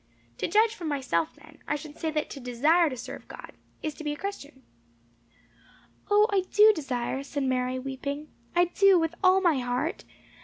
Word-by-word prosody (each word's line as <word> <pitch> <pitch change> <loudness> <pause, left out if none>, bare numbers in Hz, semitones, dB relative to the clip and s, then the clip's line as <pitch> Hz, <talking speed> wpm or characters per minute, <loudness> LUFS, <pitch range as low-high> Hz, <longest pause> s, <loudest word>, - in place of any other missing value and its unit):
To - - 0
judge 435 +5 +3
from 350 -7 -6
myself, 255 - -1
then, 305 +1 -18
I 295 - 0
should 300 0 -8
say 320 - -1
that 305 -1 -1
to 280 - -7
desire 295 +7 +3
to 255 - -6
serve 235 - -8
God, - - -10 0.3
is 310 - -2
to 310 - -10
be 295 -1 -1
a - - -8
Christian." 290 -9 -7 1.5
"O, 415 +1 +5
I 395 -1 +3
do 430 +1 +7
desire," 265 - -3
said 280 0 -4
Mary, 255 -1 0
weeping. 280 +3 -5 0.3
"I 350 0 +5
do, 390 +2 +4
with 325 0 -1
all 375 +1 +5
my 335 -7 +3
heart. 250 +8 -2
300 Hz, 185 wpm, -27 LUFS, 265-350 Hz, 1.5 s, do